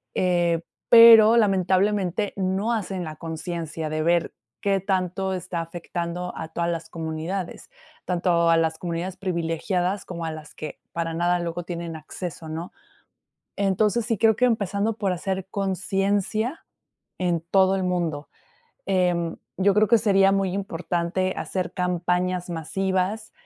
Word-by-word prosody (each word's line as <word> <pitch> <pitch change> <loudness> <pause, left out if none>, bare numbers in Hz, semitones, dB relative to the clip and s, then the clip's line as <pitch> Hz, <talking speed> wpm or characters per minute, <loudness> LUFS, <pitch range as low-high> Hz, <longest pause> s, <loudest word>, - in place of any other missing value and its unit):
eh, 175 -2 +2 0.3
pero, 230 -1 +9
lamentablemente, 195 0 +2
no 190 +4 0
hacen 190 -4 -3
la 155 - -6
conciencia 160 -1 -5
de 155 0 -1
ver 170 0 +1 0.3
qué 195 -1 +2
tanto 190 0 -1
está 180 -2 -3
afectando 175 +1 -5
a 160 - -5
todas 170 +1 -1
las 165 -1 -5
comunidades, 165 - -5 0.4
tanto 170 -2 +2
a 165 - +5
las 160 -1 +1
comunidades 175 +2 -4
privilegiadas 180 +1 -1
como 170 -2 -5
a 160 - -2
las 155 -1 -10
que 155 -2 -7
para 165 -1 -2
nada 175 +1 +1
luego 170 0 -3
tienen 170 -2 -5
acceso, 160 +1 -7
¿no? 165 +3 -5 0.9
Entonces, 205 +3 +1
sí, 225 -4 0
creo 220 0 +4
que 250 - +4
empezando 210 -1 0
por 200 -4 0
hacer 190 +1 -3
conciencia 200 - -1 0.5
en 175 -2 0
todo 190 0 +4
el 190 - -1
mundo. 170 -5 -2 0.6
Em, 175 -3 +1 0.2
yo 195 +1 +3
creo 210 +1 +4
que 235 - +6
sería 195 -2 +4
muy 195 -2 +1
importante 185 -1 -2
hacer 180 -2 -3
campañas 180 0 -1
masivas, 190 +5 -2
180 Hz, 140 wpm, -24 LUFS, 170-195 Hz, 0.9 s, pero